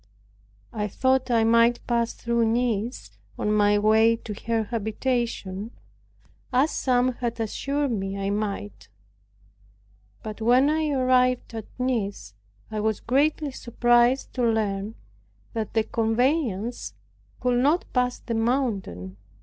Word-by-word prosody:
I 210 -1 -2
thought 260 +5 +1
I 230 -2 +3
might 230 +1 +3
pass 235 -1 0
through 235 -1 0
Nice 235 0 -1 0.3
on 210 - 0
my 205 0 +4
way 220 +2 +4
to 225 -2 -7
her 225 -1 +1
habitation, 220 -2 -2 0.8
as 265 +5 +3
some 255 -1 +2
had 235 -1 -3
assured 275 +5 -1
me 195 -2 -3
I 195 0 -2
might. 205 0 -4 1.4
But 215 0 -7
when 250 +6 +4
I 310 0 0
arrived 255 -2 +2
at 220 -2 -6
Nice, 225 - -2 0.4
I 215 - -2
was 215 -1 0
greatly 290 +3 +1
surprised 240 +1 +2
to 250 - -1
learn 215 -2 0 0.6
that 220 -1 -4
the 220 - +3
conveyance 230 - -1 0.4
could 250 -1 +1
not 300 +7 +2
pass 250 -1 +1
the 230 - -5
mountain. 220 - -1
230 Hz, 125 wpm, -25 LUFS, 215-250 Hz, 1.4 s, my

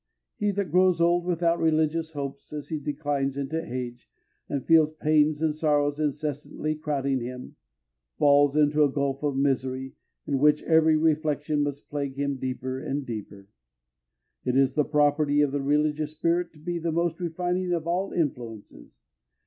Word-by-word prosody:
He 210 - 0
that 195 -5 -2
grows 180 0 +4
old 170 +1 +3
without 170 -1 +1
religious 160 0 +1
hopes, 140 -1 -6
as 150 -1 -6
he 155 - -2
declines 140 -2 -2
into 150 +4 -2
age, 125 -4 -6 0.4
and 140 -2 -3
feels 160 -2 +5
pains 155 0 +2
and 155 -1 +2
sorrows 145 -1 +1
incessantly 150 +1 -2
crowding 140 -3 -1
him, 125 +1 -7 0.6
falls 145 0 +4
into 150 0 +4
a 145 - +4
gulf 140 -1 -1
of 145 -2 -1
misery, 130 -1 -1 0.3
in 140 -2 0
which 150 +1 +4
every 160 -1 +4
reflection 155 -1 +1
must 145 0 -3
plague 140 -2 -4
him 140 0 -2
deeper 130 0 -4
and 140 +1 -3
deeper. 105 -4 -7 1.0
It 125 0 0
is 135 -1 +3
the 150 - +2
property 145 -1 +2
of 145 -2 +2
the 140 0 -1
religious 150 +2 0
spirit 170 +2 0
to - - -18
be 170 +2 -3
the 165 0 -2
most 170 +1 0
refining 180 +1 -2
of 170 -2 -1
all 180 +3 -1
influences. 115 - -4
150 Hz, 160 wpm, -26 LUFS, 140-160 Hz, 1.0 s, feels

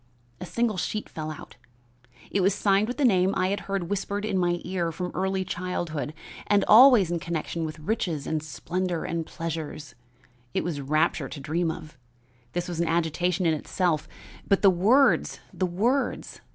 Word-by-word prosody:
A 180 - -6
single 220 +3 0
sheet 210 +5 -2
fell 155 -1 -6
out; 155 - -9 0.7
it 200 - +1
was 195 +2 +3
signed 200 0 +2
with 245 - -4
the 290 - +2
name 190 -4 +3
I 185 - +1
had 200 - -1
heard 195 -3 -1
whispered 205 +2 -2
in 215 -2 -1
my 175 -1 +1
ear 175 -3 -2
from 180 +2 -4
early 190 0 -1
childhood, 175 -5 -3 0.3
and 205 -1 +3
always 225 -6 +8
in 170 - 0
connection 165 0 -3
with 155 0 -6
riches 160 -4 -2
and 155 -1 -1
splendor 175 +3 -3
and 165 -1 -3
pleasures, 160 -3 -5 0.6
it - - +1
was 160 -5 -3
rapture 155 +3 +1
to 145 - -7
dream 165 +5 -1
of. 155 -3 -8 0.5
This 175 0 -2
was 175 -2 -4
an 170 - +1
agitation 170 +2 0
in 165 - +3
itself, 155 0 -1 0.4
but 195 0 +2
the 195 - +8
words 225 +11 +3
the 185 - 0
words! 230 +10 -1
175 Hz, 175 wpm, -26 LUFS, 160-195 Hz, 0.7 s, always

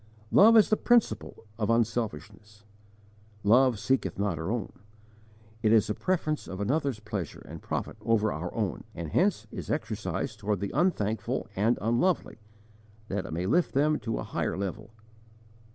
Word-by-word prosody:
Love 225 +3 +7
is 215 - +5
the 215 - +4
principle 240 - +1
of 105 - 0
unselfishness: 105 -3 -2 0.8
love 120 +3 +5
'seeketh 100 -6 0
not 100 -4 -1
her 80 +3 -3
own'; 115 -3 -3 0.9
it 110 - +3
is 110 -2 +5
the 105 - -1
preference 155 - -1
of 95 - -6
another's 135 +2 0
pleasure 105 -7 -5
and - - -9
profit - - -4
over 110 -2 +2
our 85 +3 -4
own, 105 -6 -2
and 85 -2 -5
hence 195 +1 +2
is - - -7
exercised - - -3
toward 105 -1 -1
the 100 0 -3
unthankful 110 - 0
and 110 +5 +2
unlovely, 120 - 0 0.7
that 95 -1 -2
it - - -8
may 85 +3 -2
lift 170 - +1
them 150 +2 +3
to 115 -2 -3
a - - -3
higher - - -2
level. 100 +3 -4
110 Hz, 155 wpm, -28 LUFS, 100-135 Hz, 0.9 s, Love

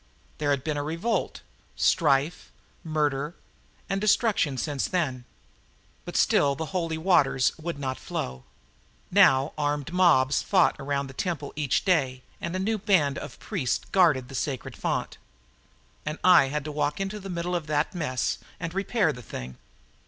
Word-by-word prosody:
There 150 -1 0
had 140 -2 +1
been 150 -1 -2
revolt, 165 +10 -2 0.3
strife, 150 0 +2 0.3
murder 150 -1 -1 0.5
and 195 0 -1
destruction 205 - +2
since 145 0 -1
then. 135 -9 -1 0.8
But - - -4
still 140 -1 +3
the 160 - -4
holy 165 -3 -1
waters 145 -7 +3
would 170 -1 -4
not 130 -3 -3
flow. 65 0 -5 0.7
Now 135 +3 +5
armed 145 +2 -1
mobs 150 -7 +4
fought 185 -3 +3
around 140 0 -1
the 135 - -10
temple 155 -1 -3
each 150 -4 0
day 135 -9 +1 0.2
and 170 - -3
a - - 0
new 215 +3 0
band 155 -9 +2
of 125 - -9
priests 125 - -2
guarded 155 -10 +4
the 135 - -11
sacred 130 -1 -3
fount. - - -3 0.8
And 155 +1 -4
I 180 -6 +7
had 150 +2 -2
to 155 - -4
walk 150 +1 -1
into 195 +2 -3
the 195 -1 -8
middle 175 0 -3
of 165 -3 -3
that 150 +3 0
mess 140 -8 -1 0.2
and 165 -1 -4
repair 195 -3 +1
the 125 - -10
thing. 65 - -8
150 Hz, 155 wpm, -26 LUFS, 135-175 Hz, 0.8 s, I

